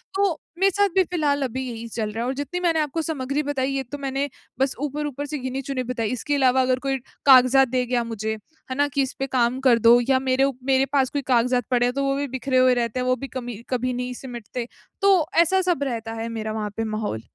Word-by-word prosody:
तो 395 -5 +1 0.2
मेरे 390 0 +4
साथ 405 +1 +2
भी 380 - +5
फिलहाल 300 -5 0
अभी 260 +1 -3
यही 230 -1 -6
चल 215 -1 -3
रहा 225 +2 -3
है - - -2
और 260 - -1
जितनी 290 +6 -3
मैंने 330 -2 +2
आपको 305 +2 -1
सामग्री 290 -2 -2
बताई, 270 -2 -1
ये 270 - -1
तो 275 +4 -7
मैंने 275 0 -2 0.3
बस 270 0 +1
ऊपर-ऊपर 290 -1 -3
से 300 +1 -4
गिनी-चुनी 260 0 -3
बताई। 235 -3 -2
इसके 270 +4 -1
अलावा 260 -1 +4
अगर 255 0 +1
कोई 270 0 -1 0.3
कागज़ात 265 0 +7
दे 250 0 0
गया 245 -1 0
मुझे, 220 -1 -3 0.4
है - - -1
ना, 285 +2 +2
कि, 280 0 0
"इसपे 270 0 -3
काम 250 0 +1
कर 235 -2 +5
दो।" 235 +2 +7
या 260 - +4
मेरे 260 +1 +3
उ 275 0 +2
मेरे 270 0 +3
पास 265 -2 +3
कोई 285 - -2
कागज़ात 245 0 +2
पड़े 245 -1 +3
हैं, 245 - 0
तो 275 - -1
वो 275 0 +1
भी 285 0 -2
बिखरे 260 0 -1
हुए 255 0 +5
रहते 240 0 -1
हैं, 250 - -1
वो 255 - +3
भी 275 +2 -7
कमी 240 -3 -5
कभी 255 0 -1
नहीं 250 0 -3
सिमटते। 240 -1 -6 0.3
तो 385 -5 +5 0.2
ऐसा 375 +3 +2
सब 285 -4 -1
रहता 230 -4 -3
है 230 - -3
मेरा 215 0 -3
वहाँ 215 -1 -3
पे 225 - 0
माहौल। 215 - -3
260 Hz, 240 wpm, -23 LUFS, 245-280 Hz, 0.4 s, कागज़ात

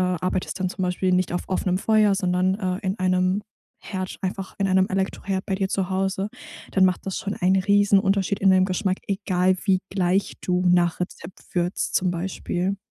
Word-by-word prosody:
arbeitest 180 +1 -1
dann 185 - +1
zum 190 - -5
Beispiel 185 +1 0
nicht 180 -1 +1
auf 175 - -1
offenem 185 -1 0
Feuer, 215 -1 +3
sondern, 185 -1 +1
äh, 185 -2 -1
in 190 +3 -1
einem 185 +2 +1 0.4
Herd, 185 -2 -5
einfach 190 +1 -4
in 195 - +1
einem 190 0 +3
Elektroherd 190 0 -2
bei 195 - -1
dir 190 0 -1
zu 190 -1 -1
Hause, 195 +1 -1 0.4
dann 190 - +4
macht 185 -1 +1
das 190 - -2
schon 200 0 -3
einen 190 +1 +2
Riesenunterschied 200 0 +3
in 195 - +5
deinem 185 0 +5
Geschmack, 185 0 -1
egal 185 -2 +1
wie 190 -2 +3
gleich 190 0 0
du 180 0 0
nach 175 -1 +3
Rezept 180 0 -6
würzt 175 +1 -1
zum 185 -1 +2
Beispiel. 180 +2 -2
185 Hz, 180 wpm, -24 LUFS, 180-195 Hz, 0.4 s, in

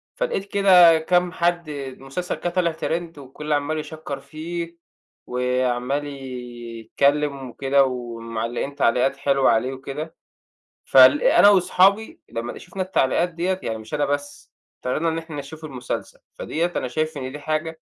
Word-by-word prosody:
فلقيت 475 - -2
كده 180 -5 +7
كام 180 +2 +2
حد، 175 -2 0 0.3
مسلسل 135 +7 -4
كده 175 - -3
طالع 175 -1 +1
trend 165 0 -3
وكله 145 +2 -3
عمال 155 +2 -1
يشّكر 155 -3 -6
فيه، 170 +3 -6 0.5
وعمال 125 +3 -1
يتكلم 130 +2 -2
وكده 140 +2 +2
ومعلقين 120 +1 -4
تعليقات 130 +2 +2
حلوة 135 -2 +2
عليه 125 +4 +1
وكده. 140 +4 -7 0.7
فل - - +7
أنا - - +6
وأصحابي 195 +2 +3
لما 115 +1 -5
شفنا 185 +2 -7
التعليقات 175 -1 +1
ديّة، 180 +2 -2
يعني 110 -1 -2
مش 110 +3 -12
أنا 145 -1 +1
بس، 145 0 -4 0.3
قررنا 155 +6 0
إن 160 - -2
احنا 165 -2 -7
نشوف 155 +3 -8
المسلسل، 125 -4 -5
فديّة 170 +2 -2
أنا 125 - -1
شايف 155 +4 -2
إن 130 -1 -5
دي 150 - -7
حاجة 155 +2 -3
145 Hz, 140 wpm, -23 LUFS, 130-170 Hz, 0.7 s, كده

